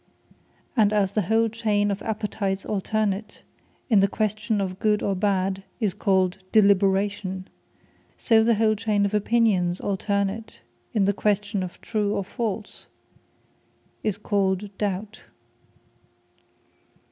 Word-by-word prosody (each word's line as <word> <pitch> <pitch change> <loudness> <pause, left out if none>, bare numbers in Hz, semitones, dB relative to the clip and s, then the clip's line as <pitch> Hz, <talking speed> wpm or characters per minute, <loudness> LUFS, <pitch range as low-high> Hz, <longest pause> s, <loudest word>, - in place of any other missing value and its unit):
And 215 -4 +4
as 205 -3 +2
the 210 - +1
whole 225 +4 +2
chain 210 -2 0
of 200 0 -3
Appetites 205 -3 -2
alternate, 210 0 -2 0.4
in 220 -5 +4
the 195 - +4
question 215 +1 -1
of 190 -1 -3
Good 210 -1 +1
or 200 - +1
Bad 195 -1 0 0.2
is 210 -6 0
called 190 -1 +1
Deliberation; 195 -2 +2 0.7
so 225 -2 +4
the 230 0 +3
whole 215 0 +3
chain 210 -1 +1
of 200 - -2
Opinions 210 -5 +2
alternate, 200 - -2 0.3
in 205 -3 +3
the 200 - +2
question 205 0 0
of 185 -1 -6
True, 210 -2 -1
or 200 - -1
False 215 +1 -5 1.1
is 210 -3 -1
called 200 -1 -1
DOUBT. 205 +1 -3
205 Hz, 125 wpm, -25 LUFS, 195-215 Hz, 1.1 s, And